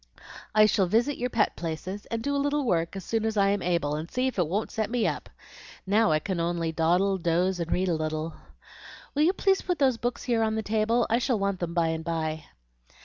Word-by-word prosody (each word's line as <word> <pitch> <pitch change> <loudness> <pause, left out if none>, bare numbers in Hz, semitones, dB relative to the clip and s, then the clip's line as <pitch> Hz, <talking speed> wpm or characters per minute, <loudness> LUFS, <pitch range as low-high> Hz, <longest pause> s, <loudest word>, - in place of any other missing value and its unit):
"I 215 0 +7
shall 200 -3 +2
visit 235 +9 +1
your 250 - -1
pet 225 -3 +1
places 175 +4 -5
and 230 -1 -3
do 285 0 0
a 280 - +1
little 290 0 0
work 170 -4 0
as 195 - -5
soon 225 -1 -1
as 220 -1 -1
I 195 -1 +4
am 200 -1 0
able, 170 -5 0
and 155 +3 -4
see 255 0 -1
if 260 -6 -2
it 175 - +2
won't 205 +6 -2
set 220 -2 -2
me 240 -1 0
up. - - -2 0.6
Now 210 +2 +3
I 155 - +4
can 185 +2 -3
only 170 -1 -1
dawdle, 180 +4 +2
doze, 175 +2 +1
and 170 0 -3
read 185 +1 +1
a 175 - +1
little. 155 0 -2 0.8
Will 290 - 0
you 335 +5 +4
please 390 0 +2
put 360 -2 -1
those 260 -4 +3
books 240 +1 -3
here 235 -3 +1
on 220 0 +1
the 220 - -2
table? 220 +3 +1
I 230 - +4
shall 250 -2 +1
want 200 -2 -1
them 170 -1 -4
by 165 -2 +2
and 160 0 -3
by." 160 -2 -3
200 Hz, 240 wpm, -27 LUFS, 170-230 Hz, 0.8 s, I